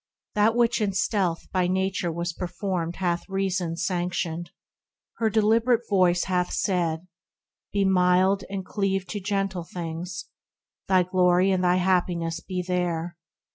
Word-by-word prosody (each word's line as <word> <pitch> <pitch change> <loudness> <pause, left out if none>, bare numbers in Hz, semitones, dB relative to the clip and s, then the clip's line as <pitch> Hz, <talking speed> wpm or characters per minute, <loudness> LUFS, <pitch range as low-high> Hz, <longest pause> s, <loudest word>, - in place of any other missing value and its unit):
That 215 +2 +3
which 235 -1 +2
in 200 -2 0
stealth 185 -3 0
by 185 -2 +1
Nature 185 -1 0
was 170 +1 -3
performed 175 -1 -3
Hath 175 0 -2
Reason 190 -3 -1
sanctioned; 175 -2 -2 0.7
her 225 -1 +2
deliberate 225 +3 +2
Voice 180 -3 +3
Hath 180 -1 0
said; 170 -3 0 0.7
be 200 -1 +1
mild, 185 +1 +3
and 195 -1 -4
cleave 195 -2 -1
to 205 - -3
gentle 195 -2 -2
things, 175 +1 -6 0.6
Thy 185 -1 +4
glory 180 +1 +3
and 185 -1 +1
thy 180 0 +4
happiness 175 -2 +1
be 180 0 -4
there. 175 -2 -1
185 Hz, 135 wpm, -25 LUFS, 175-195 Hz, 0.7 s, Thy